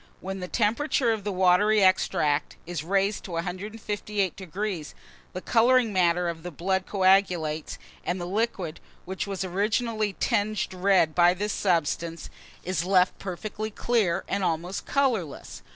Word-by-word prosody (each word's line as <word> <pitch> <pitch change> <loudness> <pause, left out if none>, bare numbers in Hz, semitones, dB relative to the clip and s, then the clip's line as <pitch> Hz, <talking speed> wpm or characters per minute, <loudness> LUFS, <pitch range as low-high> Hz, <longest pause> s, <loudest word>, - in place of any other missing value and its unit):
When 190 +1 -5
the 180 - -5
temperature 235 +4 +1
of 220 -2 -2
the 205 - -2
watery 190 +3 +4
extract 155 -5 +2
is 170 -3 -4
raised 195 +4 0
to 180 - -7
158°, 195 -1 -3 0.4
the 185 - -5
colouring 240 0 +3
matter 175 -1 +2
of 165 -1 -4
the 180 - -6
blood 190 +3 -1
coagulates, 185 -5 +2 0.3
and 180 +1 -2
the 175 - -4
liquid, 190 -4 -2 0.3
which 190 +2 -4
was 195 -1 -3
originally 215 +3 0
tinged 210 0 0
red 185 -4 +3
by 175 +1 +5
this 205 +3 -2
substance, 165 -2 -1 0.3
is 185 -1 -1
left 185 0 +2
perfectly 210 +3 -5
clear, 210 -5 0
and 200 0 -1
almost 175 +2 -2
colourless. 195 - -1
190 Hz, 135 wpm, -26 LUFS, 175-210 Hz, 0.4 s, by